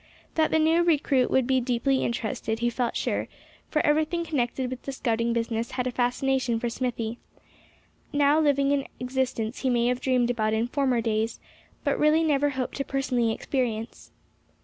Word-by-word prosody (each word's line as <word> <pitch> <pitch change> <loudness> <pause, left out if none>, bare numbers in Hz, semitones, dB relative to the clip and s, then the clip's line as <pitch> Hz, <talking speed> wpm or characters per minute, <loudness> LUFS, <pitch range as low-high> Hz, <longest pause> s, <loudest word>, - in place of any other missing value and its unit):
That 315 -1 +2
the - - +2
new 320 +2 +4
recruit 290 -6 +2
would 265 -2 +2
be 260 0 +2
deeply 250 +2 +1
interested, 220 -1 -2
he 240 +1 0
felt 240 0 -1
sure; - - -1 0.4
for 305 - +1
everything 315 +3 +1
connected 255 -4 -1
with 255 - -6
the 275 - -5
scouting 235 -3 0
business 230 0 -2
had 255 -1 -1
a 255 - -1
fascination 250 0 0
for 240 - -1
Smithy; 235 -2 -3 0.9
now 290 +1 +3
living 280 -2 +3
an 275 -1 -1
existence 250 -2 -2
he 265 - 0
may 240 -1 +2
have 250 0 -1
dreamed 250 -2 +2
about 215 -2 0
in 220 +1 +1
former 260 -2 +1
days, 225 0 -1 0.4
but - - 0
really 305 +2 +4
never 290 -2 +2
hoped 260 -2 -4
to 275 - -1
personally 255 -4 0
experience. 230 -2 -3
255 Hz, 170 wpm, -26 LUFS, 235-280 Hz, 0.9 s, new